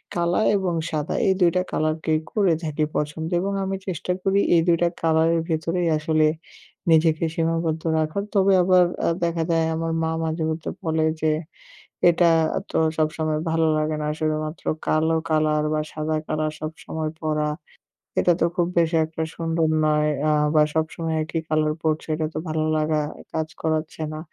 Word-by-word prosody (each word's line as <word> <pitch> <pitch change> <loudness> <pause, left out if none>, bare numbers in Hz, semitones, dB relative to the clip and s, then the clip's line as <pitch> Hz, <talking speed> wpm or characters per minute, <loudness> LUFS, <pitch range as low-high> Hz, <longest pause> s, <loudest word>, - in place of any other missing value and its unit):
কালা 175 +3 +1 0.2
এবং 190 -3 -1 0.2
সাদা 150 -1 -2
এই 190 - +5
২ 175 -2 +5
টা 180 - +3
কালারকেই 155 0 0
করে 195 -5 +2
থাকি 155 -1 -1
পছন্দ 150 +2 -2
এবং 200 +2 -2
আমি 195 0 -2
চেষ্টা 180 0 -3
করি 195 +1 +2 0.2
এই 165 - +5
২ 170 -1 +4
টা 175 - +4
কালারের 165 +1 +3
ভেতরেই 165 +2 0
আসলে 155 0 +2 0.6
নিজেকে 160 0 +4
সীমাবদ্ধ 165 -1 0 0.2
রাখার। 155 +6 -1
তবে 195 0 +4
আবার 185 0 +5 0.2
আ - - +4
দেখা 170 -1 0
যায় 165 -1 +2
আমার 165 0 -2
মা 160 - 0
মাঝে 160 0 -2
মধ্যে 160 0 -3
বলে 160 -1 +1 0.2
যে 155 - +3 0.8
এটা 170 0 +4 0.4
তো - - 0 0.2
সবসময় 155 0 0
ভালো 165 0 +2
লাগে 155 0 0
না - - -1
শুধুমাত্র 155 0 -2 0.2
কালো 160 +1 +2
কালার 155 -1 +2
বা 155 - +1
সাদা 155 0 -2
কালার 155 0 -1
সবসময় 155 0 -5
পরা। 155 -1 0 0.7
এটা 175 - +4
তো - - +5
খুব 175 -1 +1
বেশি 165 0 +3
একটা 160 0 -4
সুন্দর 165 -1 0 0.2
নয় 150 0 +2 0.2
আ - - +3 0.2
বা 155 - +6
সবসময় 160 0 -1
একই 160 +1 -3
কালার 155 0 +1
পড়ছে 155 -1 -1
এটা 155 0 -1
তো - - -5
ভালো 155 0 0
লাগা 155 0 +1 0.3
কাজ 160 -1 -1
করাচ্ছে 160 0 -2
না। 155 - -5
160 Hz, 170 wpm, -23 LUFS, 155-165 Hz, 0.8 s, বা